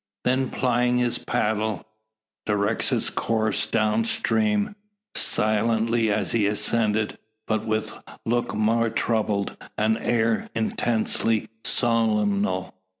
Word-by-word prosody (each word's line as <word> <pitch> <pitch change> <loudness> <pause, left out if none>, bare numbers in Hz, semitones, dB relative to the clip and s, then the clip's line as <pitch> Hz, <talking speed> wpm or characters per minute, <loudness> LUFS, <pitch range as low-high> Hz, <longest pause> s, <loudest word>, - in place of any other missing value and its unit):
Then 130 +1 +1
plying 125 -1 +1
his 125 -1 +1
paddle, 110 -1 -1 0.6
directs 105 +1 0
its - - 0
course 110 -2 0
down 110 0 +1
stream, 110 - 0 0.4
silently 110 +1 +2
as - - 0
he 110 -3 +2
ascended, 105 0 0 0.3
but 110 0 -1
with 110 0 -1 0.3
look 120 -3 0
more 115 +2 +2
troubled, 110 -3 -1 0.2
and 110 +1 +1
air 115 -1 0
intensely 115 0 0
solemnal. 105 -5 +1
110 Hz, 100 wpm, -24 LUFS, 105-115 Hz, 0.6 s, silently